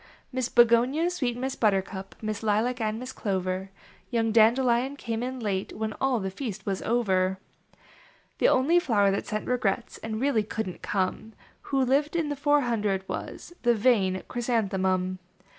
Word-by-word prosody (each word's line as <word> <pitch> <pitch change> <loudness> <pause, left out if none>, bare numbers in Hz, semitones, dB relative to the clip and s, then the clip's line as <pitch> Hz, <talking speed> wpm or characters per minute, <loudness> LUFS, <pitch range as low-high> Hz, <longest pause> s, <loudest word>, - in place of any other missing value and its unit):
Miss 255 -2 -1
Begonia, 245 +8 +4
sweet 250 -9 -2
Miss 265 +1 -3
Buttercup, 195 -2 -1
Miss 215 -1 -3
Lilac 225 +3 0
and 215 0 -1
Miss 255 +2 -6
Clover; 190 -2 -2 0.4
Young 225 -2 +1
Dandelion 240 +4 +3
came 230 -5 -4
in 255 +1 -4
late 200 -4 -2
When 215 0 -2
all 265 -3 +2
the 190 -1 -3
feast 215 -1 -6
was 195 -1 -2
over. 190 -5 +1 0.4
37 - - -30 0.6
The - - +5
only 320 - +4
flower 205 - +2
that 195 - -2
sent 215 0 -3
regrets 240 -2 -1
And 220 -1 -4
really 265 -3 +2
couldn 210 -2 -4
t - - -18
come, 200 +3 -2 0.4
Who 270 -2 +2
lived 285 +5 +1
in 325 -3 0
the 290 - -2
four 290 +1 +3
hundred, 210 -6 -1
was - - -6
The 240 -1 +3
vain 205 -5 +2
Chrysanthemum. 190 -6 0
225 Hz, 165 wpm, -27 LUFS, 195-255 Hz, 0.6 s, The